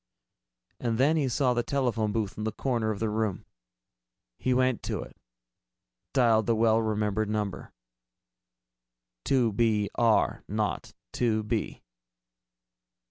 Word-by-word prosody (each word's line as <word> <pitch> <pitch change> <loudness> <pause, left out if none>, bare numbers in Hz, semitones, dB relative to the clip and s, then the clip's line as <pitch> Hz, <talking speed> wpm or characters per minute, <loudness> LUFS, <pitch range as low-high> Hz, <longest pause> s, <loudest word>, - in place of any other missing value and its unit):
And 115 -2 -1
then 140 +6 +3
he 150 -4 +1
saw 125 0 +2
the 120 - +1
telephone 120 -5 0
booth 105 -2 -2
in 105 - -5
the 110 - -1
corner 115 -1 -1
of 110 - -2
the 110 - 0
room. 105 -3 -2 0.9
He 130 - 0
went 130 -1 +2
to - - -3
it, - - -14 1.0
dialed 115 -5 +3
the 115 - +3
well 110 0 +3
remembered 105 -1 -1
number: 105 -2 -3 1.5
"2 125 -5 +2
B 105 -2 +1
R 115 -2 +2
0 105 0 0 0.4
2 110 -3 +1
B." 105 - -3
110 Hz, 130 wpm, -28 LUFS, 110-125 Hz, 1.5 s, then